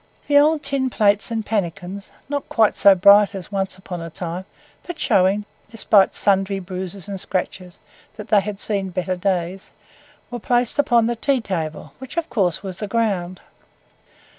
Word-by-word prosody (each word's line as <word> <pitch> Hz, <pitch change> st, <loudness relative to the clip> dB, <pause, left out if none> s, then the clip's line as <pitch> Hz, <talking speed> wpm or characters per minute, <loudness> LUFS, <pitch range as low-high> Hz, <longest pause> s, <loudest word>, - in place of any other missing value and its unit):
The 285 Hz, 0 st, +5 dB
old 305 Hz, +1 st, +3 dB
tin 275 Hz, -2 st, -1 dB
plates 205 Hz, -2 st, +2 dB
and 225 Hz, -2 st, -3 dB
pannicans, 195 Hz, -1 st, -4 dB, 0.2 s
not 285 Hz, 0 st, -4 dB
quite 220 Hz, -2 st, +3 dB
so 200 Hz, -1 st, +6 dB
bright 200 Hz, +2 st, +6 dB
as 190 Hz, 0 st, -8 dB
once 195 Hz, -1 st, -2 dB
upon 185 Hz, -2 st, -7 dB
a 165 Hz, -, -6 dB
time, 175 Hz, +2 st, -6 dB, 0.4 s
but 350 Hz, -2 st, -8 dB
showing, 200 Hz, -3 st, +2 dB, 0.2 s
despite 210 Hz, -3 st, +3 dB
sundry 195 Hz, 0 st, +1 dB
bruises 185 Hz, 0 st, -7 dB
and 195 Hz, -1 st, -5 dB
scratches, 185 Hz, -1 st, -4 dB, 0.4 s
that 210 Hz, -, -9 dB
they 210 Hz, -3 st, +5 dB
had 200 Hz, 0 st, -6 dB
seen 200 Hz, -3 st, -2 dB
better 185 Hz, +1 st, -2 dB
days, 185 Hz, 0 st, -2 dB, 0.6 s
were 240 Hz, -, -5 dB
placed 245 Hz, +3 st, 0 dB
upon 235 Hz, -5 st, +3 dB
the 240 Hz, +1 st, -1 dB
tea 270 Hz, +3 st, +1 dB
table, 165 Hz, -8 st, -5 dB
which 265 Hz, +4 st, -10 dB
of 335 Hz, -, -2 dB
course 190 Hz, -7 st, 0 dB
was 190 Hz, -2 st, -7 dB
the 210 Hz, -, -4 dB
ground. 195 Hz, -5 st, -1 dB
200 Hz, 165 wpm, -21 LUFS, 185-230 Hz, 0.6 s, so